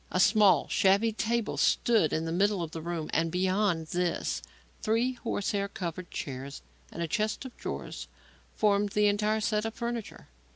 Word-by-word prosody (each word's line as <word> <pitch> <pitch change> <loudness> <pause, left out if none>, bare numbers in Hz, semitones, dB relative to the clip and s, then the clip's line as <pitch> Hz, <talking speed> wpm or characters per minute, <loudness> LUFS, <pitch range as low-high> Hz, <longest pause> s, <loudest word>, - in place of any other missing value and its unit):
A 185 - -1
small, 205 -1 +5
shabby 200 +4 +3
table 230 0 -1
stood 220 -10 +3
in 160 - -1
the 165 - -3
middle 195 +1 +2
of 160 - -6
the 165 - -6
room; 165 -1 -3
and 165 0 +2
beyond 185 -1 +1
this, 175 -1 -1 0.4
three 230 +4 +1
horsehair 200 -4 -2
covered 180 -2 -5
chairs 135 +1 -6 0.3
and 170 - -4
a - - -2
chest 215 - -1
of 255 - -9
drawers - - -6 0.5
formed 205 -1 +2
the 210 -1 +3
entire 210 +1 +2
set 210 0 +1
of 225 0 -4
furniture. 235 -2 -5
200 Hz, 165 wpm, -29 LUFS, 170-215 Hz, 0.5 s, small